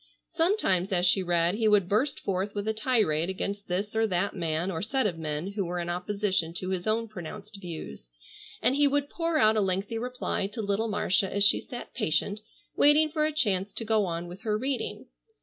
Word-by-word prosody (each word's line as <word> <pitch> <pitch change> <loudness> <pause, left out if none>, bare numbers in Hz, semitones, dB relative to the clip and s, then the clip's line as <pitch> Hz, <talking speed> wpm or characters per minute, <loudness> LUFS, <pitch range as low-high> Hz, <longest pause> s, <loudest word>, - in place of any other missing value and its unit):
Sometimes 325 - +1
as 180 -1 +2
she 190 +1 +4
read 175 -1 +2
he 220 +1 +1
would 205 -4 +4
burst 235 +8 +1
forth 195 +1 -2
with 205 +1 -3
a 220 - +1
tirade 215 -8 +1
against 200 +1 -4
this 200 +4 -2
or 225 0 +3
that 185 0 -1
man 170 +1 -1
or 160 -2 -3
set 260 +5 0
of 175 -5 -1
men 155 +4 -3
who 200 -1 -2
were 180 0 -3
in 175 0 -2
opposition 185 -2 -1
to 185 +1 -3
his 185 +1 -2
own 225 +1 +1
pronounced 200 +1 -9
views, 155 - -7 0.5
and 260 - +3
he 290 0 +4
would 285 0 0
pour 330 -1 0
out 220 -3 +5
a - - +3
lengthy 195 +4 -1
reply 250 -4 -2
to 205 +3 -8
little 205 +1 0
Marcia 205 -1 +1
as 200 0 +2
she 205 - +5
sat 245 -3 -9
patient, 205 -1 0 0.4
waiting 300 +2 +5
for 305 0 0
a - - -2
chance 205 -10 0
to 225 - -4
go 220 -2 +2
on 170 0 -3
with 180 +3 -10
her 210 -1 0
reading. 260 +3 -2
200 Hz, 210 wpm, -28 LUFS, 180-225 Hz, 0.5 s, out